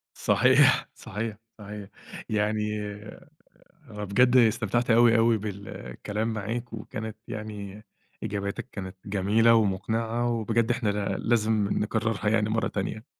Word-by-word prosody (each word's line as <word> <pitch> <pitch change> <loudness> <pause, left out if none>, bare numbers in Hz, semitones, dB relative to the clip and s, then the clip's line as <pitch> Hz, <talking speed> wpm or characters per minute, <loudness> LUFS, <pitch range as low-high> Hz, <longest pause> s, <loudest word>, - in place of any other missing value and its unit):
صحيح، - - +4
صحيح، 105 +1 -5 0.2
صحيح. 105 -1 -8 0.4
يعني 105 0 0 1.1
أنا 105 -1 -6
بجد 125 +6 +4
استمتعت 115 +1 +2
أوي، 115 0 +6
أوي 115 0 +4
بالكلام 105 - -5
معاك، 115 +3 -4
وكانت 110 0 -6
يعني 105 -1 -7 0.4
إجاباتك 100 +5 -4
كانت 95 -2 -7
جميلة 105 +4 +3
ومقنعة، 115 +3 0
وبجد 115 +1 +1
إحنا 115 -3 0
لا 100 0 -1
لازم 110 -3 +1
نكررها 110 -1 0
يعني 110 -1 +2
مرة 115 +1 +1
تانية. 110 +3 -4
110 Hz, 115 wpm, -27 LUFS, 105-115 Hz, 1.1 s, أوي